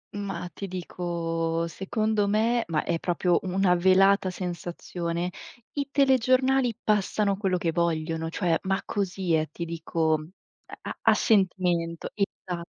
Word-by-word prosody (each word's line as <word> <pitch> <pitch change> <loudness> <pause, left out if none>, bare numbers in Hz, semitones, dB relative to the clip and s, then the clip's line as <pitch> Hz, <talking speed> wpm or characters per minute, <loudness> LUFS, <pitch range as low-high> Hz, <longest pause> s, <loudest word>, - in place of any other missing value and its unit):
Mah 200 -3 -4
ti 195 - -6
dico 170 -2 -2
secondo 210 +4 0
me 225 +3 +2
ma 160 -3 0
è 170 -1 -1
proprio 175 0 +1
una 185 -1 +2
velata 190 +2 +4
sensazione, 175 -1 -4 0.4
i 285 -1 -3
telegiornali 260 -2 +3
passano 205 -1 +1
quello 190 -3 0
che 170 -1 0
vogliono, 165 -1 -1
cioè, 170 -1 +1
ma 190 0 0
così 190 -3 -1
eh, 155 0 0
ti 170 - -5
dico, 165 -1 -1
uhm 155 +1 -10 0.5
a - - -6
a - - +6
sentimento 180 -5 +1
Esa 185 -4 -3
180 Hz, 130 wpm, -26 LUFS, 170-200 Hz, 0.5 s, a